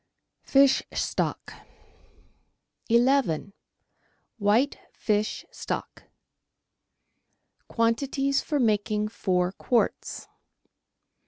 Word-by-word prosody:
Fish 275 -1 +4
Stock - - -2 1.4
u— 235 - +2 0.9
WHITE 220 +7 +2
FISH 210 0 -1
STOCK - - -6 1.6
Quantities 270 +4 0
for 295 - -1
making 210 -2 +1
Four 180 -4 0
Quarts. 235 +4 -1
230 Hz, 60 wpm, -26 LUFS, 205-270 Hz, 1.6 s, Fish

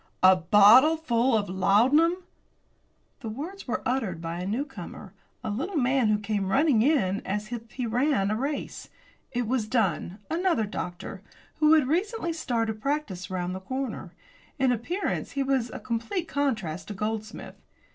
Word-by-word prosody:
"A 185 0 +8
bottleful 235 - +5
of 205 -1 -1
laudanum!" 260 - +3 1.0
The 235 -5 -6
words 315 - -7
were 245 - -2
uttered 230 -9 -1
by 165 +1 -5
a 180 - -4
newcomer 215 -5 -5 0.3
a 215 - -2
little 325 - -3
man 260 -2 +2
who 215 0 +3
came 205 -2 -2
running 270 +1 +3
in 225 -8 +2
as 210 +3 -4
if 230 -1 -6
he 250 +2 -4
ran 235 -3 +1
a - - +1
race. 280 +6 -4 0.4
It 245 -3 -2
was 240 -3 0
Dunn, 195 -6 0
another 335 - +1
doctor, 180 -3 -6 0.4
who 305 0 +5
had 305 -5 +4
recently 355 - -1
started 230 -8 -2
practice 275 -10 -2
round 180 -1 -3
the 185 - -5
corner. 260 +5 -5 0.5
In 265 -2 +3
appearance 290 - -2
he 275 - 0
was 265 -3 0
a - - -7
complete 255 - -3
contrast 220 - -2
to 210 - -6
Goldsmith. 215 +2 -5
235 Hz, 155 wpm, -27 LUFS, 205-285 Hz, 1.0 s, A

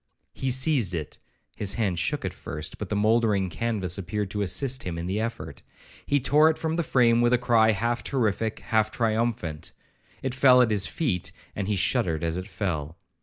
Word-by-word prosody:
He 130 - -3
seized 130 - +2
it;—his 85 +5 -5
hand 100 -7 0
shook - - -1
at - - -3
first, 75 +4 -6
but 105 - -5
the 105 - -1
mouldering 105 -3 +2
canvas 100 -4 -2
appeared 100 +2 -3
to 105 - -2
assist 125 +8 +1
him 85 -2 -4
in 85 - -4
the 95 +4 -2
effort. 115 +1 -5 0.5
He 145 - +2
tore 150 +5 +4
it 160 - -1
from 160 0 -2
the 170 - +1
frame 120 -6 +3
with 120 +1 +3
a - - +5
cry 115 -2 +3
half 120 +3 -1
terrific, 110 -4 -1
half 110 -1 +1
triumphant;—it 115 - -3
fell 130 -1 +6
at 115 - 0
his 100 -3 +1
feet, 115 - -2 0.2
and 100 -1 -3
he 105 - 0
shuddered 85 -3 0
as 85 0 -1
it 90 +1 -5
fell. 80 -5 -4
110 Hz, 185 wpm, -26 LUFS, 95-120 Hz, 0.5 s, fell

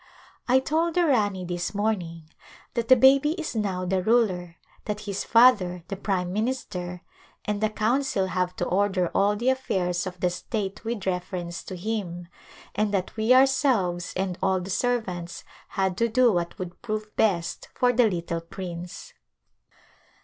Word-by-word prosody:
I 255 +1 +5
told 320 +5 0
the 355 -1 +4
Rani 205 - +1
this 175 +2 -3
morning 185 -6 -1 0.5
that 235 -1 -2
the 255 - +8
baby 270 +4 +5
is 325 -7 -5
now 190 -4 -1
the 185 +1 0
ruler, 185 -6 +1 0.3
that 210 0 -3
his 200 -2 -3
father, 205 -8 +4
the 195 - -3
prime 185 -2 -2
minister, 190 -6 -3 0.4
and 210 0 -2
the 215 - +2
council 220 -1 0
have 185 -1 -1
to 175 - -2
order 190 -2 +1
all 200 +1 +2
the 240 +5 +1
affairs 185 -9 0
of 180 -1 -7
the 180 0 +1
state 200 +3 -4
with 230 -2 -4
reference 180 -1 -3
to 190 - -6
him, 180 -3 -4 0.5
and 210 0 0
that 190 -3 -2
we 220 +2 +1
ourselves, 255 -10 +3
and 185 -1 -2
all 190 0 +2
the 185 +2 -6
servants, 185 -7 -2 0.2
had 190 -1 -1
to 230 - +2
do 245 +1 +4
what 170 -1 -2
would 180 -1 -7
prove 215 -2 -4
best 170 -6 0
for 250 0 +3
the 240 -2 +4
little 170 -2 -3
prince. 175 0 -8
195 Hz, 160 wpm, -26 LUFS, 180-230 Hz, 0.5 s, the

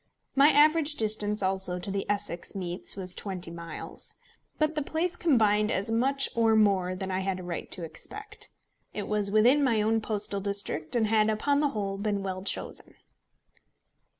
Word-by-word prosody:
My 280 +2 +7
average 305 +1 +4
distance 210 -2 0
also 190 -1 +2
to 180 +2 -5
the 195 0 -3
Essex 205 -4 -3
meets 180 -1 -1
was 185 -2 -2
twenty 180 -4 -4
miles. 170 -2 -7 0.4
But 310 0 +1
the 305 - -1
place 330 +4 -1
combined 215 -11 +3
as 200 0 -1
much 270 +4 +2
or 225 -1 +3
more 195 -4 +2
than 190 0 -4
I 185 - -1
had 190 -1 -2
a - - -8
right 175 -1 -5
to 180 - -2
expect. 420 - -7 0.5
It 205 - -4
was 210 -1 +2
within 240 +8 +4
my 235 -5 +2
own 220 +1 +1
postal 205 -2 -1
district, 200 -4 -2
and 230 -2 +3
had, 215 0 +3
upon 280 +7 +1
the 295 -1 +2
whole, 200 -5 -3
been 205 -1 -1
well 185 -1 -4
chosen. 195 - -3
210 Hz, 175 wpm, -28 LUFS, 190-240 Hz, 0.5 s, My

